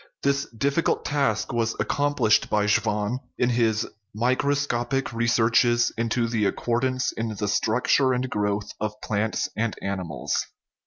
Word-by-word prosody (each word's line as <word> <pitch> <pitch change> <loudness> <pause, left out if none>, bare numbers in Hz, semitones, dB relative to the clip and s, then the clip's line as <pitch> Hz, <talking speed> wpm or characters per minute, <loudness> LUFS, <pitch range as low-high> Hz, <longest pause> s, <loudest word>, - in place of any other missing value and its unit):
This 140 0 +1
difficult 140 +7 0
task 140 -8 0
was 115 -1 0
accomplished 145 -7 +2
by 105 -1 +2
Schwann 105 +2 +1 0.2
in 125 - +2
his 115 -2 +1 0.3
Microscopic 130 +1 0
Researches 115 +1 +3
into 115 +1 0
the 115 -3 0
Accordance 130 +5 0
in 115 -1 -4
the 105 +1 -2
Structure 125 +6 +2
and 125 +1 0
Growth 105 -2 -1
of 105 0 -3
Plants 110 +1 -1
and 115 0 -1
Animals 90 -10 -4
(1839). - - -2
115 Hz, 130 wpm, -25 LUFS, 105-130 Hz, 0.3 s, Researches